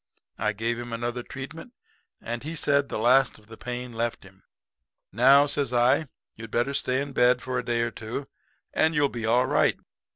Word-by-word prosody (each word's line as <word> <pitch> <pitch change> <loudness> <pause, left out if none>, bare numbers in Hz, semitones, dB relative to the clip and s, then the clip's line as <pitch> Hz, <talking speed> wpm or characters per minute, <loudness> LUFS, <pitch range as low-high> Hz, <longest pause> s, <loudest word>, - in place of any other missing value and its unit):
I 105 - 0
gave 115 +3 -2
him 120 0 -7
another 120 +1 -3
treatment, 140 - -9 0.5
and 120 0 -5
he 160 +4 -5
said 140 -2 +2
the - - -3
last 125 +5 +4
of 105 - -20
the 110 +1 -12
pain 125 +1 -6
left 115 +1 -2
him. 95 0 -18 0.7
"'Now,' 135 +7 +6
says 145 -3 0
I, 125 +5 +3 0.3
'you'd 115 0 -9
better 120 +5 0
stay 130 -1 0
in 140 -1 -5
bed 125 0 +4
for 125 0 -3
a - - -4
day 120 -1 0
or 115 0 -1
two, 115 +6 -6 0.5
and 160 +1 +2
you'll 145 -1 +3
be 115 -3 -4
all 125 +3 +3
right. - - +2
125 Hz, 195 wpm, -26 LUFS, 115-140 Hz, 0.7 s, Now